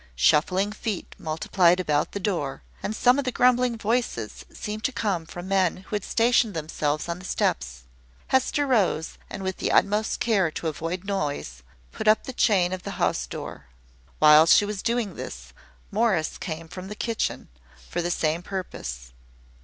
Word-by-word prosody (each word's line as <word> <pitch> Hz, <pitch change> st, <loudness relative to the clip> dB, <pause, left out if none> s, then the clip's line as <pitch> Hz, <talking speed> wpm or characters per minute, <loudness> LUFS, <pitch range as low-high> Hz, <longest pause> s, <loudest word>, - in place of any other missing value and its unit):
Shuffling 180 Hz, -, +3 dB
feet 215 Hz, -2 st, -4 dB
multiplied 170 Hz, +3 st, +2 dB
about 150 Hz, -4 st, 0 dB
the 200 Hz, -, -3 dB
door; 170 Hz, -9 st, -2 dB, 0.2 s
and 215 Hz, -, -3 dB
some 250 Hz, +5 st, +4 dB
of -, -, 0 dB
the 255 Hz, -, -1 dB
grumbling 250 Hz, -1 st, +3 dB
voices 220 Hz, -, -2 dB
seemed 215 Hz, +1 st, -6 dB
to -, -, +1 dB
come 195 Hz, -9 st, -1 dB
from 175 Hz, +2 st, -8 dB
men 190 Hz, -3 st, +2 dB
who 190 Hz, +3 st, -6 dB
had 205 Hz, -, -2 dB
stationed 230 Hz, -3 st, +2 dB
themselves 155 Hz, -1 st, -2 dB
on 170 Hz, +1 st, -3 dB
the 185 Hz, -, -11 dB
steps. -, -, -1 dB, 0.5 s
Hester 265 Hz, +3 st, +2 dB
rose, 205 Hz, -, +1 dB
and, 195 Hz, -, -6 dB
with 190 Hz, -1 st, -2 dB
the -, -, -1 dB
utmost 210 Hz, +2 st, +2 dB
care 200 Hz, -7 st, +2 dB
to 160 Hz, -, -4 dB
avoid 165 Hz, +4 st, -3 dB
noise, 145 Hz, -, -3 dB, 0.3 s
put -, -, -5 dB
up 215 Hz, +1 st, +5 dB
the 260 Hz, -, -6 dB
chain 185 Hz, -6 st, +3 dB
of 185 Hz, -, -4 dB
the -, -, -6 dB
house -, -, 0 dB
door. -, -, -7 dB, 0.5 s
While 155 Hz, +1 st, +7 dB
she 205 Hz, -, +6 dB
was 205 Hz, -1 st, -4 dB
doing 235 Hz, -5 st, -1 dB
this, 60 Hz, 0 st, -8 dB, 0.4 s
Morris 200 Hz, -7 st, +1 dB
came 165 Hz, -2 st, -5 dB
from 185 Hz, +2 st, -8 dB
the 210 Hz, -, -6 dB
kitchen, 230 Hz, +1 st, -2 dB, 0.4 s
for 175 Hz, -, -2 dB
the 175 Hz, -, -1 dB
same 160 Hz, -1 st, 0 dB
purpose. 65 Hz, -, -6 dB
185 Hz, 170 wpm, -25 LUFS, 160-215 Hz, 0.5 s, While